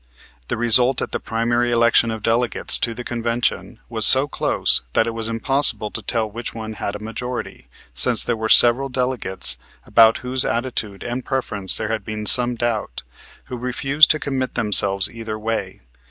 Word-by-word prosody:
The -, -, -3 dB
result 120 Hz, +3 st, +3 dB
at -, -, -7 dB
the -, -, -3 dB
primary 120 Hz, +1 st, -1 dB
election 115 Hz, 0 st, +2 dB
of 110 Hz, -2 st, -6 dB
delegates 115 Hz, +1 st, +1 dB
to 115 Hz, -1 st, -2 dB
the 125 Hz, -, -7 dB
convention 120 Hz, 0 st, -3 dB
was -, -, -3 dB
so -, -, +5 dB
close -, -, +2 dB
that 115 Hz, -, +2 dB
it 115 Hz, -, -4 dB
was 115 Hz, 0 st, -1 dB
impossible 115 Hz, -2 st, +1 dB
to 115 Hz, -, -6 dB
tell 110 Hz, +1 st, -1 dB
which 115 Hz, +3 st, -7 dB
one 110 Hz, -1 st, -7 dB
had 100 Hz, -1 st, -5 dB
a -, -, -7 dB
majority, 120 Hz, +3 st, -7 dB, 0.3 s
since 110 Hz, -, +2 dB
there 120 Hz, -, -2 dB
were 110 Hz, 0 st, -4 dB
several 125 Hz, +5 st, +5 dB
delegates, 125 Hz, -, -2 dB, 0.3 s
about 115 Hz, -1 st, +4 dB
whose 130 Hz, 0 st, 0 dB
attitude 115 Hz, -5 st, -4 dB
and 120 Hz, +1 st, -5 dB
preference 105 Hz, -8 st, -1 dB
there 110 Hz, -, -4 dB
had 110 Hz, -2 st, -3 dB
been 105 Hz, +1 st, -6 dB
some 125 Hz, +2 st, +4 dB
doubt, 115 Hz, -, -4 dB, 0.4 s
who 125 Hz, -, -8 dB
refused 135 Hz, +4 st, +2 dB
to 155 Hz, -, +2 dB
commit 130 Hz, -3 st, -4 dB
themselves 100 Hz, -2 st, +4 dB
either 115 Hz, -2 st, -7 dB
way. 110 Hz, -4 st, -5 dB
115 Hz, 175 wpm, -20 LUFS, 110-125 Hz, 0.4 s, so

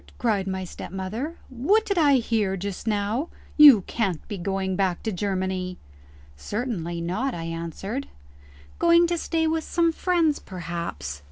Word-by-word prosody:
cried 210 Hz, -6 st, 0 dB
my 190 Hz, 0 st, -2 dB
stepmother, 195 Hz, -, -5 dB
"what 310 Hz, -, +2 dB
did 400 Hz, -, 0 dB
I 295 Hz, -5 st, +5 dB
hear 220 Hz, -6 st, +1 dB
just 200 Hz, +3 st, -5 dB
now? 215 Hz, +8 st, 0 dB, 0.3 s
You 285 Hz, -9 st, +9 dB
can't 190 Hz, -4 st, -2 dB
be 205 Hz, -, -4 dB
going 190 Hz, +1 st, -1 dB
back 185 Hz, -2 st, 0 dB
to 220 Hz, -, -1 dB
Germany!" 185 Hz, -1 st, -2 dB, 0.6 s
"Certainly 175 Hz, -, -3 dB
not," 215 Hz, +11 st, -1 dB
I 165 Hz, -, -5 dB
answered. 170 Hz, -, -4 dB, 0.7 s
"Going 340 Hz, 0 st, +6 dB
to 345 Hz, 0 st, 0 dB
stay 325 Hz, 0 st, 0 dB
with 320 Hz, 0 st, 0 dB
some 335 Hz, 0 st, +2 dB
friends 330 Hz, -3 st, +1 dB
perhaps?" 170 Hz, -, -5 dB
205 Hz, 145 wpm, -25 LUFS, 185-285 Hz, 0.7 s, You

